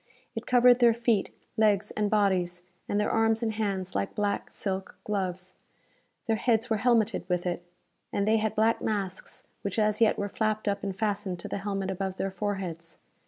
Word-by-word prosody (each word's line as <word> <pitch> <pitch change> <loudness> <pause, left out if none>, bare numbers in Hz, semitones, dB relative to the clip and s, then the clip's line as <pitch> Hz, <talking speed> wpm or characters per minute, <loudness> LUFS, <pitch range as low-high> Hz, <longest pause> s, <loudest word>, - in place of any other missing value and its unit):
It 225 -1 -6
covered 245 0 +6
their 235 -2 +6
feet, 235 -4 +1 0.3
legs 210 -2 +3
and 210 -1 0
bodies; 185 -4 +1 0.3
and 205 - +1
their 210 - +1
arms 225 0 +2
and 220 -1 0
hands 200 -4 -2
like 100 0 -2
black, 205 -1 -1
silk 190 -1 -4
gloves. 185 -3 -3 0.7
Their 225 -3 +1
heads 230 +1 +1
were 220 - +3
helmeted 225 -4 +2
with 180 0 0
it. 175 -1 -2 0.5
And 200 0 0
they 220 +1 +4
had 220 0 -1
black 220 +2 +2
masks 200 -3 -3 0.2
which 200 0 -3
as 215 0 +2
yet 225 - +5
were 205 - -1
flapped 215 +1 -1
up 200 0 0
and 195 -2 -3
fastened 205 -3 -1
to - - -6
the - - -3
helmet 195 -1 -2
above 190 0 -3
their 195 - -1
foreheads. 180 -4 -4
205 Hz, 185 wpm, -28 LUFS, 190-220 Hz, 0.7 s, covered